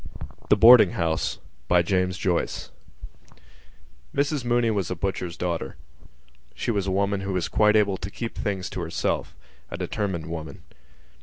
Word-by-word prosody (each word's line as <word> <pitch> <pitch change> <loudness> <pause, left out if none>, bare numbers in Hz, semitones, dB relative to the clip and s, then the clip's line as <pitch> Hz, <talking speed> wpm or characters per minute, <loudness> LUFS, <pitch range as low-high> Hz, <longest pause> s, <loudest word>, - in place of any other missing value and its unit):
THE - - +6
BOARDING 115 -3 +8
HOUSE 80 -8 -1 0.3
Mrs 90 0 0 1.7
Mooney 120 -1 +2
was 100 -5 -1
a 90 - -2
butcher's 90 -1 -3
daughter. 85 -6 -3 0.8
She - - -2
was 100 -3 -1
a - - 0
woman 100 +1 0
who 95 0 -3
was 90 -2 -1
quite 105 0 +3
able 100 -3 +3
to 95 - -6
keep 115 +3 -6
things 95 -3 -3
to - - -4
herself: 85 -1 -2 0.3
a - - -6
determined 95 -7 -3
woman. 80 -1 -7
95 Hz, 135 wpm, -25 LUFS, 85-105 Hz, 1.7 s, BOARDING